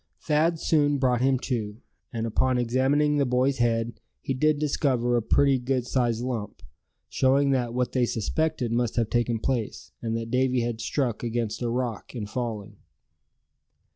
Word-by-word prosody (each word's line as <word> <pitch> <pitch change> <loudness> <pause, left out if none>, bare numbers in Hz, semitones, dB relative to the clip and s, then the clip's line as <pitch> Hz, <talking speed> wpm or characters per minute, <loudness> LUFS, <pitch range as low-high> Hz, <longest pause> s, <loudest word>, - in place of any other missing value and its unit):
Thad 160 +2 +1
soon 145 -3 +2
brought 125 -3 +1
him 135 0 +3
to; 110 -5 -3 0.3
and 115 -2 -3
upon 130 +3 +1
examining 135 +5 +2
the 140 - +3
boy's 125 +2 +1
head 115 0 0 0.2
he 135 - -3
did 155 +3 +2
discover 130 -5 +1
a 120 - +2
pretty 135 +4 +3
good 125 0 -1
sized 120 -2 0
lump, 115 -5 -4 0.4
showing 135 - +2
that 120 -3 0
what 125 0 0
they 125 -2 +1
suspected 125 +3 -1
must 120 -1 0
have 115 -2 0
taken 120 -1 +1
place; 115 -2 -3
and 115 -1 -2
that 115 0 -5
Davy 130 -1 +2
had 115 -1 -3
struck 125 -6 -1
against 115 -2 -2
a 120 - -1
rock 120 -1 -3
in 110 -4 -4
falling. 110 -2 -5
125 Hz, 165 wpm, -26 LUFS, 115-135 Hz, 0.4 s, him